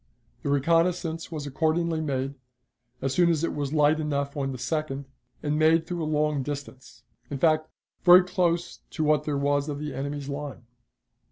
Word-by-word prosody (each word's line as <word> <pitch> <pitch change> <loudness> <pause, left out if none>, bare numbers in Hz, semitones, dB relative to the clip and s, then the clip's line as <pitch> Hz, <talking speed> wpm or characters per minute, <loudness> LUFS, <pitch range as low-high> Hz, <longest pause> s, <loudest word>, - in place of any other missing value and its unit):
The - - -3
reconnaissance 165 +3 +1
was 150 -3 -4
accordingly 160 +3 0
made, 135 -2 -2 0.7
as 135 -1 0
soon 175 +1 +4
as 165 -2 +1
it 170 - 0
was 145 -2 -3
light 150 0 +3
enough 140 -2 -2
on 135 -2 -2
the 130 - -5
2d, 140 +1 -3 0.4
and 150 0 0
made 160 +1 +4
through 175 -1 -4
a 155 - -2
long 150 -2 +1
distance 135 -4 -7 0.3
in 140 - -3
fact, 155 +2 +2 0.3
very 180 0 +9
close 175 -2 0
to 155 - -2
what 150 -1 +2
there 145 -2 -1
was 145 +1 +1
of 145 - -3
the 150 -1 -5
enemy's 140 +1 -4
line. 145 -3 -6
150 Hz, 175 wpm, -26 LUFS, 140-160 Hz, 0.7 s, very